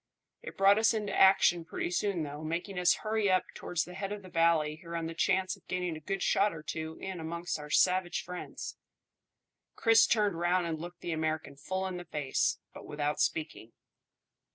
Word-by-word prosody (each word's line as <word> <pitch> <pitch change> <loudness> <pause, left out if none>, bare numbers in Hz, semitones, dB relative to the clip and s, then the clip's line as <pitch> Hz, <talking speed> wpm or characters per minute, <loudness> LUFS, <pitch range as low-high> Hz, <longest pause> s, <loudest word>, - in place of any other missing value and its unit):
It - - -9
brought 195 +2 +6
us 225 +1 +3
into 210 -2 -2
action 190 -3 +5
pretty 165 - -4
soon 185 -2 0
though, 145 +1 -6
making 175 +4 -3
us 180 0 +4
hurry 215 -2 +1
up 185 -1 +3
towards 175 -1 -2
the 180 - -10
head 195 +2 -4
of 205 -1 -5
the 185 - -11
valley 165 -2 +2
here 170 0 -8
on 165 -1 -2
the 165 - -4
chance 190 +2 +1
of 195 - -25
getting 180 -2 -2
a - - -7
good 195 +5 -3
shot 200 -2 +2
or 155 - -9
two 160 +1 -5
in 190 -2 -5
amongst 170 +1 -4
our 150 0 -8
savage 180 +2 +2
friends." 180 0 -7 1.0
Chris 225 0 +5
turned 205 -6 +1
round 175 +1 +2
and 160 -2 -3
looked 175 0 -9
the 175 - -4
American 155 -2 -2
full 185 +7 -3
in 185 -1 -4
the 175 - -8
face, 150 -4 0 0.2
but - - -11
without 150 0 -2
speaking. 155 -8 -2
175 Hz, 200 wpm, -31 LUFS, 160-190 Hz, 1.0 s, brought